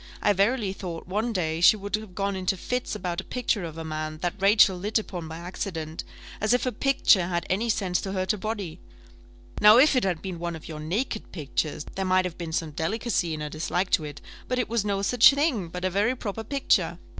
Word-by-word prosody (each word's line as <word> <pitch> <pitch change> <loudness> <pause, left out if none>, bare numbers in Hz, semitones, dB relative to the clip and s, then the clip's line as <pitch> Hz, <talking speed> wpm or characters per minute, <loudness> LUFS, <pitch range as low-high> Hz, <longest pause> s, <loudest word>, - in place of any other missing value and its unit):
I 205 - +3
verily 200 +1 +1
thought, 175 -4 -6
one 215 +6 -1
day, 165 -5 -1
she 195 +5 +7
would 200 0 -2
have 215 -4 -8
gone 200 0 -1
into 185 0 -1
fits 250 +7 -3
about 180 0 -3
a - - -16
picture 240 -5 -1
of 165 -1 -6
a 165 - -5
man, 155 0 -4
that 175 - 0
Rachel 195 -1 +5
lit 205 +5 -1
upon 180 -6 -4
by 160 0 -7
accident, 170 -2 -5 0.4
as 215 +3 +3
if 250 - +2
a 255 - 0
picture 245 -10 +3
had 175 -1 -2
any 220 +5 0
sense 190 -4 0
to 195 - -4
hurt 185 0 0
a - - -4
body! 200 -6 -4 0.8
Now 210 +2 +8
if 285 +3 +6
it 255 - +2
had 180 -4 -1
been 185 -3 -5
one 170 0 -3
of 160 - -10
your 155 -2 -7
naked 215 - -3
pictures, 150 -1 -3
there 195 - -2
might 185 0 +2
have 180 -2 -4
been 170 -2 -5
some 160 -1 -2
delicacy 170 +1 -1
in 155 - -7
her 150 - -4
dislike 175 +4 -2
to 160 - +3
it; 145 -1 -8 0.3
but 255 - -1
it 250 - -1
was 230 -2 0
no 200 -1 -1
such 240 +3 +7
thing, 280 - 0
but 180 +2 -5
a - - +2
very 210 +7 +1
proper 220 -1 -4
picture. 275 +4 +1
190 Hz, 230 wpm, -26 LUFS, 170-215 Hz, 0.8 s, Now